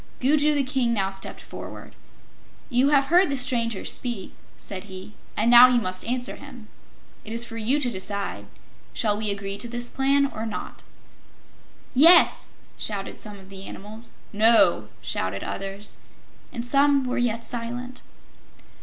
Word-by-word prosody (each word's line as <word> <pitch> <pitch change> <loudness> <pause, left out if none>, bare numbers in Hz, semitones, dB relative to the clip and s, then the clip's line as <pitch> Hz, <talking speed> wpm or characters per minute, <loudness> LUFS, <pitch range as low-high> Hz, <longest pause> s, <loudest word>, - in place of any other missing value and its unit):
Gugu 295 +3 +3
the 285 - +2
King 255 -3 0
now 195 -2 0
stepped 195 0 -5
forward. - - -10 0.8
"You 250 +3 +3
have 280 -2 +4
heard 360 -1 +5
the 275 - -1
stranger 230 -4 0
speak," 235 -7 -3 0.2
said 190 -1 -7
he, 190 +1 -10 0.2
"and 230 +3 +2
now 245 +1 +10
you 250 -1 +3
must 185 -4 -3
answer 245 +1 -1
him. 255 -6 -12 0.5
It 220 - -9
is 230 +1 -1
for 230 - -9
you 250 +7 +1
to 275 - 0
decide. 190 - -5 0.5
Shall 210 -3 +1
we 215 0 -1
agree 200 0 -4
to 240 - -6
this 240 0 -3
plan, 275 +1 +2
or 225 -4 -5
not?" 215 - -7 1.1
"Yes!" 330 +7 +6 0.3
shouted 200 -2 -5
some 210 -2 -6
of 190 -1 -15
the 195 0 -9
animals. 215 +4 -10 0.2
"No!" 205 - +4
shouted 95 +1 -3
others. 195 +1 -6 0.5
And 235 0 -5
some 280 +2 +3
were 250 0 -2
yet 230 -1 -1
silent. 245 +2 -5
230 Hz, 155 wpm, -24 LUFS, 200-255 Hz, 1.1 s, now